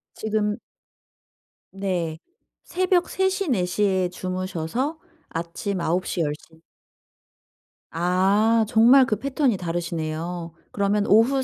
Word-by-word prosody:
지금 210 -1 -1 1.2
네. 180 -5 -2 0.4
새벽 365 0 +1
3:00, 380 0 0
4:00 180 -3 0
에 185 -2 +1
주무셔서 185 - -3 0.3
아침 170 +4 -4
9:00, 180 +2 -1
10:00 160 +1 -5 1.3
아 195 +6 +3
정말 250 +4 +6
그 215 -4 -1
패턴이 270 -5 0
다르시네요. 170 -1 -4 0.2
그러면 205 +1 +1
오후 250 +6 +4
195 Hz, 150 characters per minute, -24 LUFS, 175-230 Hz, 1.3 s, 정말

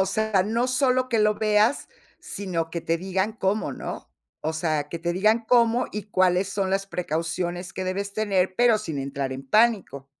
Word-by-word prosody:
O 190 - +3
sea, 210 -1 +1
no 230 +4 0
solo 255 0 +2
que 230 -3 +1
lo 210 0 +3
veas, 215 +5 +2 0.3
sino 170 -5 -4
que 170 0 -3
te 165 - 0
digan 190 +4 -1
cómo, 205 0 -1
¿no?, - - -7 0.4
o 160 - 0
sea, 155 -2 -1
que 170 - -5
te 170 +1 -2
digan 215 +5 +2
cómo 240 0 +3
y 210 - -4
cuáles 185 0 +2
son 195 -1 -1
las 195 +1 0
precauciones 175 +1 -3
que 185 - -4
debes 200 +2 -3
tener, 190 -3 0
pero 240 -2 +5
sin 165 -9 -5
entrar 135 0 -3
en 135 +1 -8
pánico. 205 - +2
190 Hz, 190 wpm, -25 LUFS, 170-215 Hz, 0.4 s, pero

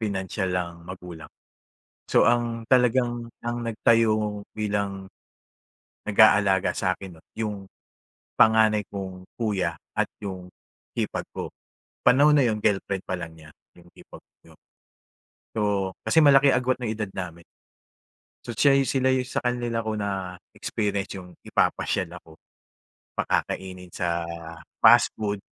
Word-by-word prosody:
pinansiyal 95 -2 -2
ang 85 -1 -3
magulang. 90 -3 -9 0.8
So - - +5
ang 120 -1 -1
talagang 120 -1 +2 0.2
ang 120 0 -3
nagtayo 110 -2 +2
bilang, 100 -2 -2 1.0
nag-aalaga 100 -3 +5
sa'kin 90 -2 -3
'no - - -25
yung, 105 -3 -4 0.7
panganay 110 -2 +5
kong 95 -2 -7
kuya 95 - -1 0.2
at - - +1 0.2
yung 95 -2 -6 0.5
hipag - - -2
ko. - - -5 0.5
Panahon 145 +3 +6
na 140 - +5
yun 110 -2 0
girlfriend 100 -2 0
pa 95 - -1
lang 85 -2 -7
niya 80 -1 -15 0.3
yung 85 - -19
hipag - - -14 0.2
ko. 80 - -18 1.0
So, 110 - -3 0.5
kasi 160 - +5
malaki 140 -1 +6
agwat 125 +1 +1
ng 115 -3 -2
edad 105 -3 -4
namin. 85 -2 -6 1.0
So 120 -3 -6
siya 140 -1 +5
yu 135 -1 +2
sila 130 -1 +2
'yung 130 0 0
sa - - -2
kanila 120 -2 -1
ko 110 - -2
na-experience 100 +1 -3
'yung 90 -2 -14
ipapasyal - - 0
ako, 80 0 -18 0.8
pakakainin 90 -2 -2
sa 85 -1 -1 0.6
fast - - +7
food, 105 -1 -2
105 Hz, 125 wpm, -25 LUFS, 95-115 Hz, 1.0 s, fast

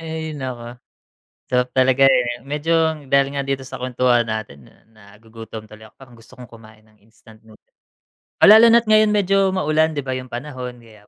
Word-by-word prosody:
Ay, 160 -1 -6
naku. 125 -4 -8 0.7
Sarap 125 0 -1
talaga, 130 +1 +4
eh. 120 -2 0
Medyo 155 +2 -1
dahil 140 0 +2
nga 140 - -3
dito 135 -1 -3
sa 130 - -9
kwentuhan 125 -1 0
natin 110 - -7
na - - -21 0.4
nagugutom 110 0 -12
tuloy 110 0 -14
ako, - - -19
parang 120 -3 -16
gusto 115 - -19
kong 125 -3 -13
kumain 110 -2 -17
ng 110 0 -29
instant 110 0 -20
nood 110 -1 -19 0.8
Oh, - - +8
lalo 220 +2 +8
na't 230 0 +4
ngayon 215 0 +5
medyo 195 -1 +1
maulan 155 -2 0
'di 145 - -4
ba 130 - -5
'yong 130 0 -5
panahon 125 0 -8
kaya 105 -2 -20
130 Hz, 185 wpm, -19 LUFS, 115-150 Hz, 0.8 s, Oh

